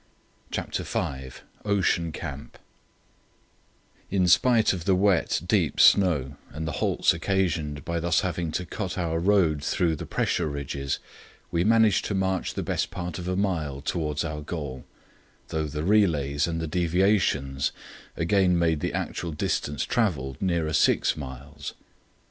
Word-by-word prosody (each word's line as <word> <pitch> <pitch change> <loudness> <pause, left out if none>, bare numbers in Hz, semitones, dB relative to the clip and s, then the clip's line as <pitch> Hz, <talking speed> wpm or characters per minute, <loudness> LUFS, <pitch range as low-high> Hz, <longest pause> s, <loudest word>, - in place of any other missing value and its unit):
CHAPTER - - -3
V 65 -1 -3 0.3
OCEAN 95 -5 +1
CAMP 70 -7 -7 1.5
In 95 -2 +2
spite 115 +4 +4
of 85 -3 -5
the 95 - +4
wet, 95 -2 +2
deep - - +1
snow 75 -9 +4
and 80 +1 -5
the - - -1
halts - - +3
occasioned 80 -7 -1
by 85 0 -1
thus 85 +1 +2
having 85 -3 -2
to 90 - -2
cut 95 +3 -4
our 80 -2 -1
road 85 -6 +2
through 85 +1 +1
the - - -7
pressure - - 0
ridges, 70 -1 -3 0.5
we 85 0 +1
managed 110 -1 +4
to 100 - -2
march 95 -1 -1
the - - -2
best - - -1
part 90 -3 -5
of 90 - -6
a 90 - 0
mile 80 -8 -1
towards 75 +1 -2
our 75 -2 -4
goal, 70 -5 -6 0.6
though 80 -1 -1
the 75 +1 -4
relays 80 -8 +2
and 80 -1 -2
the 80 - -2
deviations 85 -5 +1 0.5
again 90 +1 +3
made 80 -2 +2
the - - -2
actual 85 - -3
distance 75 -1 -1
travelled 80 - -1
nearer 85 -5 0
six 80 - +3
miles. 70 -1 -8
85 Hz, 145 wpm, -26 LUFS, 75-95 Hz, 1.5 s, spite